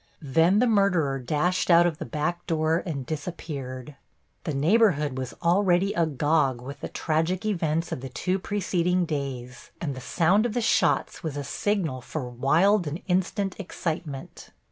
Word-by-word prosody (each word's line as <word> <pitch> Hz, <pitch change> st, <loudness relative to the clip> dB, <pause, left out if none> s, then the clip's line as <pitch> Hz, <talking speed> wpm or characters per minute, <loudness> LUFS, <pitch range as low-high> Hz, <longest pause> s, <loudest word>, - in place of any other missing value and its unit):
Then 165 Hz, +7 st, +3 dB
the 245 Hz, -, +4 dB
murderer 190 Hz, -, +2 dB
dashed 155 Hz, +10 st, 0 dB
out 170 Hz, 0 st, +7 dB
of 165 Hz, -2 st, -1 dB
the 160 Hz, -, -4 dB
back 165 Hz, +3 st, -2 dB
door 160 Hz, +1 st, +1 dB
and 140 Hz, -6 st, -3 dB
disappeared. 145 Hz, -4 st, -6 dB, 0.5 s
The 155 Hz, -, -2 dB
neighborhood 150 Hz, -, +3 dB
was 130 Hz, -2 st, -5 dB
already 180 Hz, +2 st, +3 dB
agog 150 Hz, -4 st, +1 dB
with 135 Hz, +3 st, -8 dB
the -, -, -5 dB
tragic 165 Hz, +5 st, -1 dB
events 165 Hz, -5 st, 0 dB
of -, -, -4 dB
the 135 Hz, -, -6 dB
two 185 Hz, +9 st, -1 dB
preceding 180 Hz, -2 st, 0 dB
days, 130 Hz, -5 st, -5 dB
and 145 Hz, -5 st, -3 dB
the 130 Hz, -, -8 dB
sound 190 Hz, -, +2 dB
of 225 Hz, -, -6 dB
the -, -, +2 dB
shots 225 Hz, -, +1 dB
was 155 Hz, -4 st, -4 dB
a 145 Hz, -, -3 dB
signal 165 Hz, -4 st, -1 dB
for 130 Hz, +1 st, -5 dB
wild 160 Hz, -, +2 dB
and 150 Hz, +4 st, -5 dB
instant 190 Hz, +1 st, 0 dB
excitement. 160 Hz, -6 st, -5 dB
160 Hz, 160 wpm, -26 LUFS, 140-185 Hz, 0.5 s, out